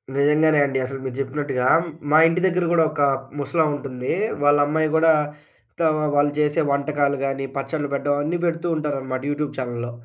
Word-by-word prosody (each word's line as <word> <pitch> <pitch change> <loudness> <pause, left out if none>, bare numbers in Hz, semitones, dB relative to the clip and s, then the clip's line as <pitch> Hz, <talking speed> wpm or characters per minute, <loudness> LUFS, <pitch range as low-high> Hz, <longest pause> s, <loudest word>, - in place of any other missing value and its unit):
నిజంగానే 150 +2 +3
అండి. 135 -1 -1
అసలు 135 +1 -6
మీరు 130 -1 -5
జెప్పినట్టుగా 135 -2 -2 0.5
మా 155 - +6
ఇంటి 165 +2 0
దగ్గర 180 -1 0
గూడా 165 -1 +4
ఒక 150 - -3 0.4
ముసలాముంటుంది. 145 -4 -2 0.3
వాళ్ళ 145 0 +5
అమ్మాయి 155 +1 0
గూడా, 160 0 +5 0.6
ఇట్లా 165 - 0 0.3
వాళ్ళు 145 0 +3
చేసే 150 +2 +1
వంటకాలు 140 0 0
గాని, 135 0 -2
పచ్చడ్లు 145 +1 -3
పెట్టడం 145 +1 0
అన్నీ 170 +4 -1
పెడుతూ 165 0 -1
ఉంటారనమాట 135 -4 -3
యూట్యూబ్ 145 0 -3
ఛానెల్లో. 120 -2 -4
145 Hz, 155 wpm, -22 LUFS, 135-155 Hz, 0.6 s, మా